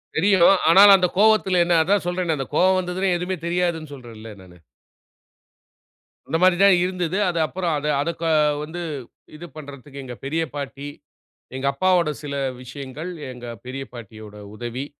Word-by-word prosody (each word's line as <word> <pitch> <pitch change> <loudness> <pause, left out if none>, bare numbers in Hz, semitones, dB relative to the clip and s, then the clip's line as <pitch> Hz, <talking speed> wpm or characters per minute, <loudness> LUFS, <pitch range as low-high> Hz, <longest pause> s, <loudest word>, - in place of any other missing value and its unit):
தெரியும். 185 0 +4 0.2
ஆனால் 200 +3 +8
அந்த 180 -1 +2
கோவத்தில 205 -4 +4
என்ன 170 -1 +2
அதான் 195 +1 +1
சொல்றேனே, 175 -3 -1
அந்த 135 - -4
கோவம் 185 +2 +3
வந்ததுன்னா 185 +1 -2
எதுவுமே 180 +1 -3
தெரியாதுன்னு 170 -3 -2
சொல்றேன்ல 115 -3 -11
நானு. 90 -1 -16 1.7
அந்த 160 - 0
மாரி 185 -1 +5
தான் 200 -2 +6
இருந்தது. 180 0 -2
அது 170 - -2
அப்புறம் 170 +3 -3
அத 150 +1 -4
அத 170 - -2
க - - -4 0.4
வந்து 170 +3 -7 0.5
இது 170 +3 -10
பண்றதுக்கு 140 -2 -10
எங்க 125 -2 -8
பெரிய 160 +4 -1
பாட்டி 140 0 -6 0.7
எங்க 130 +1 -4
அப்பாவோட 180 0 +2
சில 140 -1 -5 0.3
விஷயங்கள், 140 +6 -8 0.2
எங்க 125 -1 -10 0.2
பெரிய 135 +2 -6
பாட்டியோட 110 -2 -11 0.2
உதவி, 120 +4 -5
160 Hz, 150 wpm, -22 LUFS, 135-180 Hz, 1.7 s, ஆனால்